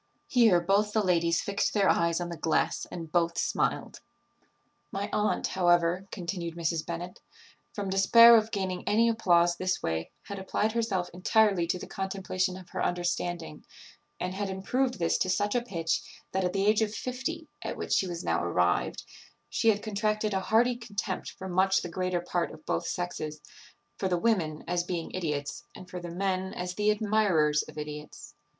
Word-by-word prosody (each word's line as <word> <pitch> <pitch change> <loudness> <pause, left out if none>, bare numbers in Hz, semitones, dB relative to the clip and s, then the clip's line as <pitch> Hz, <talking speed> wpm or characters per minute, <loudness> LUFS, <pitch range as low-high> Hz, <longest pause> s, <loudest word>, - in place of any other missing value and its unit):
Here 225 -8 +5
both 200 +4 +1
the 215 - +2
ladies 170 -2 +2
fixed 200 +2 -1
their 200 -2 +4
eyes 170 0 +2
on 175 0 -3
the 170 - -5
glass, 160 0 0
and 165 -3 -7
both 170 0 +1
smiled. - - -1 0.9
"My 200 +1 -3
aunt, 210 0 +1
however," 175 +1 +2
continued 170 -2 -4
Mrs. 165 -1 -1
Bennet, 175 +1 -6 0.5
"from 205 -2 -4
despair 230 +5 +8
of 220 -1 +3
gaining 190 -4 -3
any 225 +3 +4
applause 175 -6 +3
this 185 0 -2
way, 80 0 -2
had 200 -1 -7
applied 205 +3 0
herself 215 -6 -1
entirely 185 -1 +3
to 180 - 0
the - - -7
contemplation 190 -1 -2
of 185 -2 -12
her - - -3
understanding, 175 -2 -2 0.6
and 180 +1 -3
had 200 +1 -3
improved 250 +7 -1
this 170 -2 +1
to 185 - 0
such 205 +3 +1
a 245 - +2
pitch, 170 -9 -1 0.3
that 190 0 0
at 180 0 0
the 195 0 +1
age 215 +1 +4
of 215 0 0
fifty, 275 +6 -4
at - - -4
which - - -2
she 190 - +2
was 170 -1 -5
now 85 +1 0
arrived, 90 0 +1 0.5
she 225 - +3
had 205 -1 +1
contracted 215 0 -1
a 190 - +1
hearty 230 +5 +3
contempt 205 -4 -4
for 190 - -8
much 190 +1 +2
the 175 - -5
greater 185 0 -1
part 175 0 -1
of 155 - -13
both 85 - -1
sexes; 155 -4 -4 0.6
for 190 - 0
the 180 -1 +1
women, 170 -7 0
as 175 0 0
being 175 -2 -4
idiots, 150 -6 -3
and 185 - -10
for 180 - -5
the 175 0 -7
men, 190 +1 -2
as 180 0 -4
the 210 +2 +1
admirers 205 -8 +2
of - - -12
idiots. 150 0 -8
185 Hz, 180 wpm, -29 LUFS, 170-205 Hz, 0.9 s, despair